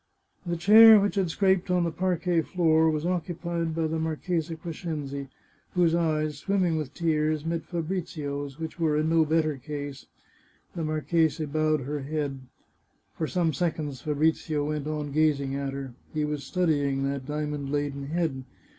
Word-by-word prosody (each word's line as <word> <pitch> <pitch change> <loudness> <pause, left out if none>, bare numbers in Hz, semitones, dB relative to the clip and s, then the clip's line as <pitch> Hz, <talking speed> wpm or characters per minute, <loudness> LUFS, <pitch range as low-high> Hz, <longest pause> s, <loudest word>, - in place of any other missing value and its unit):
The 170 0 -1
chair 215 +5 +9
which 200 0 +1
had 195 -4 0
scraped 190 +1 +2
on 180 -1 +2
the 170 - 0
parquet 175 0 +1
floor 160 -2 +3
was 155 0 -1
occupied 170 -2 -2
by 165 -1 0
the 160 +1 -1
Marchesa 160 +1 -2
Crescenzi, 155 -4 -5 0.5
whose 175 -2 +3
eyes, 155 -3 0
swimming 185 -1 +1
with 155 -4 -4
tears, 155 -2 0
met 165 -1 -2
Fabrizio's, 155 -5 -4
which 160 +2 -6
were 155 -2 +2
in 155 +1 +1
no 165 -1 +4
better 155 -2 +1
case. 145 +1 -7 0.7
The 165 - -3
marchesa 155 0 +1
bowed 155 0 +1
her 145 +3 -3
head. 145 -1 -3 0.8
For 160 - -2
some 170 -3 0
seconds 150 -4 -2
Fabrizio 150 0 0
went 150 -1 -3
on 150 -2 -3
gaz 155 -1 +3
ing 135 -1 -3
at 140 -1 -3
her. 135 -2 -6 0.2
He 155 -1 -1
was 150 -1 -3
studying 145 -6 +1
that 135 -1 -3
diamond 150 -2 -3
laden 145 -1 -2
head. 155 -4 -1
155 Hz, 160 wpm, -27 LUFS, 145-170 Hz, 0.8 s, chair